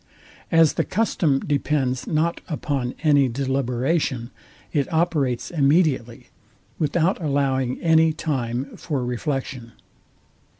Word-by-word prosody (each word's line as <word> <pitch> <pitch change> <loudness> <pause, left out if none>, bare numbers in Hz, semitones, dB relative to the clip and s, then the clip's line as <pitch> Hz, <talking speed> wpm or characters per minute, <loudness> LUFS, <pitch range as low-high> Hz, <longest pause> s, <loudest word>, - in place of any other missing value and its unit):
As 165 -2 +5
the - - 0
custom 170 -9 +1
depends 140 -3 -1
not 165 +2 0
upon 140 -6 -2
any 145 -4 +4
deliberation, 130 0 -1 0.4
it 140 -3 0
operates 160 -7 0
immediately, 140 -6 +1 0.5
without 170 +5 +1
allowing 135 -4 0
any 160 -1 +5
time 135 -4 -3
for 140 -6 -3
reflection. 125 -1 -4
140 Hz, 95 wpm, -23 LUFS, 130-160 Hz, 0.5 s, As